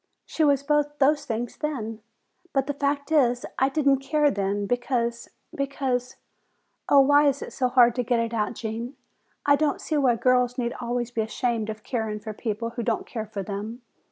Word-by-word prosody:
She 320 Hz, -, -1 dB
was 280 Hz, -2 st, +3 dB
both 295 Hz, 0 st, +1 dB
those 290 Hz, +1 st, +3 dB
things 235 Hz, -1 st, -3 dB
then. 230 Hz, -8 st, -4 dB, 0.5 s
But 270 Hz, -1 st, +2 dB
the 285 Hz, -, -2 dB
fact 285 Hz, +1 st, -1 dB
is, 245 Hz, -6 st, +3 dB
I 265 Hz, -, +3 dB
didn't 275 Hz, -2 st, +2 dB
care 295 Hz, +2 st, +2 dB
then, 200 Hz, +1 st, -1 dB
because, 235 Hz, 0 st, -1 dB, 0.2 s
because 265 Hz, -2 st, -2 dB, 0.7 s
Oh, 280 Hz, -, +7 dB
why 290 Hz, +2 st, +5 dB
is 280 Hz, 0 st, 0 dB
it -, -, -9 dB
so 255 Hz, -, +1 dB
hard 245 Hz, -2 st, +5 dB
to 250 Hz, +1 st, -1 dB
get 240 Hz, 0 st, +1 dB
it 230 Hz, 0 st, -2 dB
out, 215 Hz, 0 st, -1 dB
Gene? 230 Hz, +4 st, -5 dB, 0.5 s
I 285 Hz, -, +6 dB
don't 295 Hz, -1 st, 0 dB
see 310 Hz, -, -2 dB
why 260 Hz, -4 st, +3 dB
girls 250 Hz, +1 st, +2 dB
need 240 Hz, -1 st, -1 dB
always 240 Hz, 0 st, -2 dB
be 230 Hz, -, -1 dB
ashamed 220 Hz, 0 st, -1 dB
of 215 Hz, 0 st, -6 dB
caring 220 Hz, -4 st, -2 dB
for 215 Hz, +1 st, -7 dB
people 230 Hz, +1 st, -3 dB
who 240 Hz, 0 st, -4 dB
don't 230 Hz, -1 st, -1 dB
care 220 Hz, -3 st, -5 dB
for 205 Hz, -2 st, -5 dB
them? 210 Hz, +5 st, -6 dB
245 Hz, 190 wpm, -25 LUFS, 230-280 Hz, 0.7 s, Oh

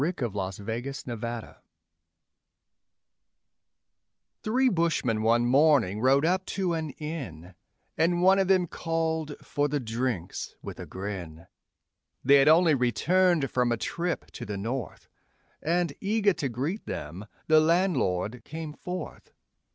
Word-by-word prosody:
_ -, -, +3 dB
The 120 Hz, -4 st, -2 dB
Glass 95 Hz, -1 st, -4 dB
on 100 Hz, -, -10 dB
the 120 Hz, +2 st, -4 dB
Bar 115 Hz, 0 st, -6 dB, 2.8 s
Three 255 Hz, +5 st, +2 dB
bushmen 165 Hz, -, +1 dB
one 115 Hz, +2 st, +3 dB
morning 130 Hz, -6 st, +3 dB
rode 135 Hz, +4 st, +4 dB
up 185 Hz, +2 st, +2 dB
to 185 Hz, -3 st, +1 dB
an 160 Hz, -2 st, -2 dB
inn, 105 Hz, -, -6 dB, 0.5 s
And 175 Hz, +2 st, +2 dB
one 190 Hz, +1 st, +6 dB
of 190 Hz, -, +2 dB
them 185 Hz, -2 st, +4 dB
called 160 Hz, -2 st, -2 dB
for 145 Hz, 0 st, 0 dB
the 145 Hz, 0 st, -1 dB
drinks 115 Hz, -6 st, -3 dB
with -, -, -8 dB
a -, -, -7 dB
grin; 90 Hz, -5 st, -6 dB, 0.8 s
They'd 140 Hz, +1 st, +6 dB
only 160 Hz, +1 st, +6 dB
returned 155 Hz, +5 st, +2 dB
from 125 Hz, -1 st, +1 dB
a 120 Hz, -, +1 dB
trip 170 Hz, +8 st, -3 dB
to -, -, -8 dB
the 105 Hz, -1 st, -4 dB
North, 115 Hz, +1 st, -5 dB, 0.5 s
And, 170 Hz, -1 st, 0 dB
eager 205 Hz, 0 st, +2 dB
to 150 Hz, -5 st, -3 dB
greet 140 Hz, -, -3 dB
them, 90 Hz, +8 st, -6 dB, 0.2 s
the 155 Hz, 0 st, +6 dB
landlord 130 Hz, -, +1 dB
came 155 Hz, -1 st, -7 dB
forth. 180 Hz, +4 st, -7 dB
140 Hz, 135 wpm, -27 LUFS, 115-170 Hz, 2.8 s, one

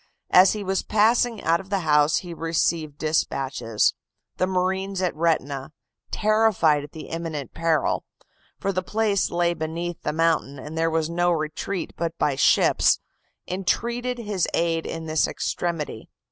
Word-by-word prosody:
As 185 Hz, +1 st, +7 dB
he 210 Hz, -1 st, -4 dB
was 190 Hz, -1 st, 0 dB
passing 225 Hz, +2 st, +2 dB
out 165 Hz, +1 st, +3 dB
of 195 Hz, -, -11 dB
the 200 Hz, -2 st, 0 dB
house 150 Hz, -2 st, +3 dB
he 175 Hz, -, -6 dB
received 165 Hz, -2 st, -1 dB
dispatches: 135 Hz, -7 st, 0 dB, 0.4 s
the 185 Hz, -, +1 dB
marines 190 Hz, +1 st, -1 dB
at 180 Hz, -4 st, 0 dB
Retina, 150 Hz, -3 st, -1 dB, 0.4 s
terrified 210 Hz, -9 st, +3 dB
at 145 Hz, -, -10 dB
the 160 Hz, -, -9 dB
imminent 165 Hz, -4 st, -5 dB
peril 165 Hz, -4 st, +1 dB, 0.5 s
(for 195 Hz, -, -1 dB
the 185 Hz, -1 st, -1 dB
place 210 Hz, 0 st, 0 dB
lay 175 Hz, 0 st, +1 dB
beneath 170 Hz, +1 st, -4 dB
the 150 Hz, -, -1 dB
mountain, 160 Hz, -3 st, +1 dB
and 150 Hz, +4 st, -8 dB
there 165 Hz, 0 st, +1 dB
was 160 Hz, -1 st, 0 dB
no 175 Hz, +1 st, +1 dB
retreat 165 Hz, +4 st, -3 dB
but 170 Hz, 0 st, -3 dB
by 145 Hz, -, +1 dB
ships), 135 Hz, -, +4 dB, 0.5 s
entreated 235 Hz, +7 st, -1 dB
his 210 Hz, -6 st, -1 dB
aid 165 Hz, -1 st, 0 dB
in 165 Hz, 0 st, -5 dB
this 155 Hz, 0 st, +1 dB
extremity. 165 Hz, -9 st, -3 dB
170 Hz, 150 wpm, -24 LUFS, 155-190 Hz, 0.5 s, As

